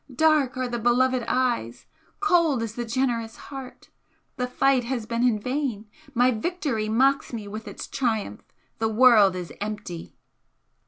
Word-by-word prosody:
Dark 285 -1 +2
are 255 0 -1
the 240 -1 -3
beloved 250 +2 +2
eyes! 240 - -1 0.4
cold 335 - +3
is 225 -2 -4
the 240 +1 -4
generous 230 -1 -1
heart! 270 -2 -10 0.4
the 250 - -2
fight 265 0 +2
has 240 -3 -3
been 230 +1 -2
in 240 -4 +3
vain 250 -3 -2 0.3
my 245 +2 +4
victory 250 -4 -2
mocks 270 +5 +2
me 220 -4 -6
with 215 +2 -7
its - - -7
triumph! 220 - -2 0.4
The 225 0 +1
world 220 -4 +6
is 180 -2 -6
empty!" 210 -5 -6
240 Hz, 150 wpm, -25 LUFS, 220-260 Hz, 0.4 s, world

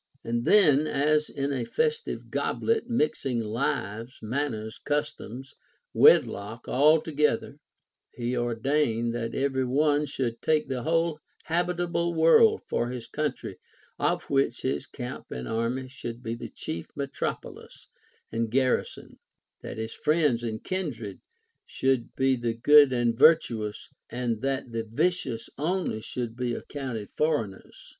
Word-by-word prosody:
And 120 +1 -2
then, 155 -8 +5
as 150 +1 +2
in 140 0 -2
a 130 -3 -1
festival 465 - -1
goblet, 450 - 0
mixing 150 - 0
lives, 115 +1 -2
manners, 110 -3 -3
customs, 145 -4 -3 0.4
wedlock, 105 +4 +4
all 150 +5 +5
together, 150 -1 0 0.5
he 120 +1 -3
ordained 120 0 0
that 115 -1 -3
every 135 -1 0
one 145 +3 +2
should 120 -5 -3
take 155 -1 +2
the 130 -2 -3
whole 165 +1 +1 0.2
habitable 170 0 0
world 295 - +5
for 120 - -1
his 125 -2 -5
country, 150 +5 -4 0.4
of - - +1
which 135 -3 0
his 130 +1 -1
camp 125 -1 -7
and 60 0 -5
army 120 +3 -1
should 120 -2 -8
be 115 - -3
the 115 - -7
chief 85 +1 -6
metropolis 140 -1 -5 0.4
and 115 0 -1
garrison; 130 +2 -1 0.4
that - - -7
his 110 0 -4
friends 150 -6 +2
and 110 -2 -4
kindred 125 - -4 0.5
should 130 -3 0
be 135 0 +3
the 120 -2 -2
good 145 +3 +7
and 120 -2 +1
virtuous, 115 -10 +3 0.2
and 120 -3 -2
that 135 -2 -2
the 115 0 -2
vicious 120 0 -1
only 170 -7 -1
should 120 0 -5
be 120 -1 -2
accounted 125 -8 -5
foreigners. 145 -11 -2
130 Hz, 130 wpm, -27 LUFS, 115-150 Hz, 0.5 s, good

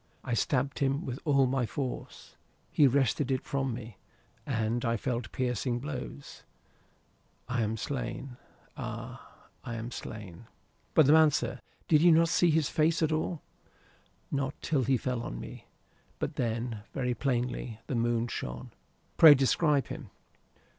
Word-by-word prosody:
I 125 - -3
stabbed 135 +3 0
him 140 +2 0
with 130 0 -4
all 140 -3 +4
my 130 -2 0
force. 130 0 -6 0.4
He 145 - +5
wrested 135 +1 +1
it 130 -1 0
from 135 -2 -1
me, 115 -4 -7 0.5
and 115 -2 0
I 115 -1 +1
felt 120 0 -3
piercing 125 -1 -1
blows. 140 +1 -7 1.1
I 125 -1 -1
am 110 +1 -1
slain. 125 +1 -4 0.4
Ay, - - -6 0.4
I 120 - -5
am 115 +2 -5
slain." 105 -3 -8 0.5
"But 155 - +7
the 145 - +6
man, 160 -1 +7
sir. 125 -3 -2 0.3
Did 150 -2 +5
you 175 +1 +7
not 165 +1 +5
see 175 +1 +4
his 155 -2 +2
face 160 +1 +2
at 160 - +2
all?" 155 +1 -2 0.9
"Not 140 0 -2
till 140 -6 +1
he 130 +2 +3
fell 125 0 -2
on - - -5
me. - - -9 0.5
But - - -3
then, 115 -2 -2
very 125 -2 0
plainly. 125 -3 -2
The - - -4
moon 120 0 +1
shone." 65 - -6 0.5
"Pray 155 -3 +10
describe 140 +2 +2
him." - - -7
130 Hz, 150 wpm, -30 LUFS, 120-145 Hz, 1.1 s, Pray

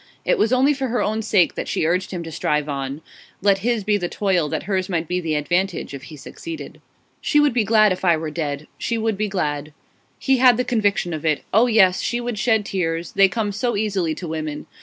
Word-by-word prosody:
It - - +2
was 220 - +2
only 265 +3 +4
for 270 -1 -2
her 245 0 0
own 215 +1 -1
sake 205 -5 +2
that - - -5
she - - -1
urged 180 +3 0
him 175 -3 -5
to 165 - -8
strive 150 -1 -1
on; 140 +1 -4 0.4
let 195 0 +3
his 230 +1 0
be 210 +1 +2
the 175 -3 -3
toil, 185 -7 0
that - - -3
hers 190 0 -1
might 170 -3 -1
be 180 +2 -1
the 160 -2 -1
advantage 175 +2 -1
if 135 -1 -8
he 155 +2 -11
succeeded. 325 - -9 0.4
'She 295 - +2
would 295 -3 +3
be 235 -2 +2
glad 215 -1 +4
if 185 - -3
I 170 -3 +4
were 155 -1 -4
dead. 150 -2 -3
She 230 - -1
would 225 -1 0
be 210 +2 -1
glad.' 150 -6 -3 0.4
He 265 -1 +2
had 250 -2 +6
the 250 - 0
conviction 205 -7 0
of 155 - -5
it. 155 -2 0
Oh 225 +5 +5
yes, 195 -6 +4
she 240 - -1
would 240 -3 -4
shed 220 -2 +2
tears; 170 -3 -2
they 195 - +5
come 210 +1 -2
so 235 +3 -1
easily 195 -7 -1
to 175 - -7
women. 155 -2 -4
190 Hz, 235 wpm, -21 LUFS, 160-220 Hz, 0.4 s, had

